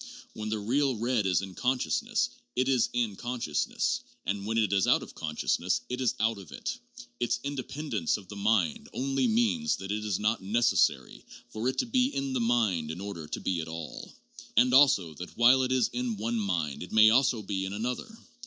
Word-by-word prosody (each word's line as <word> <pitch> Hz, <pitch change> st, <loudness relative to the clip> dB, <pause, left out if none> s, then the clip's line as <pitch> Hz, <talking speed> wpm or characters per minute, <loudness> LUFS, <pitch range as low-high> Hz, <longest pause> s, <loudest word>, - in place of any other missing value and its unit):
"When 110 Hz, 0 st, -5 dB
the 110 Hz, -, -1 dB
real 130 Hz, +6 st, +1 dB
red 115 Hz, -2 st, 0 dB
is 90 Hz, 0 st, +2 dB
in 95 Hz, -1 st, -7 dB
consciousness, 125 Hz, +5 st, 0 dB, 0.3 s
it 130 Hz, +1 st, +1 dB
is 130 Hz, -3 st, +3 dB
in 120 Hz, -4 st, -1 dB
consciousness; 120 Hz, -10 st, -1 dB, 0.2 s
and 100 Hz, +1 st, -2 dB
when 110 Hz, +1 st, -1 dB
it 110 Hz, -2 st, +2 dB
is 95 Hz, -1 st, +2 dB
out -, -, +4 dB
of -, -, -11 dB
conscious 75 Hz, -1 st, -1 dB
ness, -, -, 0 dB
it 125 Hz, +1 st, -3 dB
is 125 Hz, -, +1 dB
out 110 Hz, -1 st, +1 dB
of 95 Hz, -, -12 dB
it. 235 Hz, -, -5 dB, 0.4 s
Its 120 Hz, 0 st, 0 dB
independence 140 Hz, +2 st, -2 dB
of 100 Hz, -3 st, -13 dB
the 105 Hz, -, -9 dB
mind 100 Hz, -5 st, +1 dB
only 135 Hz, -, 0 dB
means 235 Hz, 0 st, +2 dB
that 95 Hz, +1 st, -6 dB
it 105 Hz, +1 st, -2 dB
is 105 Hz, -3 st, -1 dB
not 110 Hz, +2 st, 0 dB
necessary 115 Hz, +5 st, +1 dB, 0.3 s
for 110 Hz, +4 st, -2 dB
it 130 Hz, -, -4 dB
to -, -, +1 dB
be 250 Hz, +1 st, +2 dB
in 135 Hz, -, -3 dB
the 130 Hz, -, 0 dB
mind 110 Hz, -9 st, +1 dB
in 80 Hz, +3 st, -5 dB
order 95 Hz, -6 st, -6 dB
to -, -, -4 dB
be 90 Hz, -3 st, -1 dB
at 80 Hz, -, -7 dB
all, 80 Hz, -1 st, -7 dB, 0.5 s
and 125 Hz, 0 st, +5 dB
also 130 Hz, -, +5 dB
that 90 Hz, +4 st, -9 dB
while 125 Hz, +2 st, +6 dB
it 130 Hz, 0 st, 0 dB
is 130 Hz, -3 st, +3 dB
in 120 Hz, -2 st, -3 dB
one 115 Hz, +2 st, -1 dB
mind 85 Hz, -8 st, -2 dB
it 90 Hz, -, -8 dB
may 110 Hz, 0 st, +7 dB
also 120 Hz, -2 st, +3 dB
be 95 Hz, -1 st, -2 dB
in 95 Hz, -, -5 dB
another. 120 Hz, -, -3 dB
110 Hz, 210 wpm, -29 LUFS, 95-130 Hz, 0.5 s, may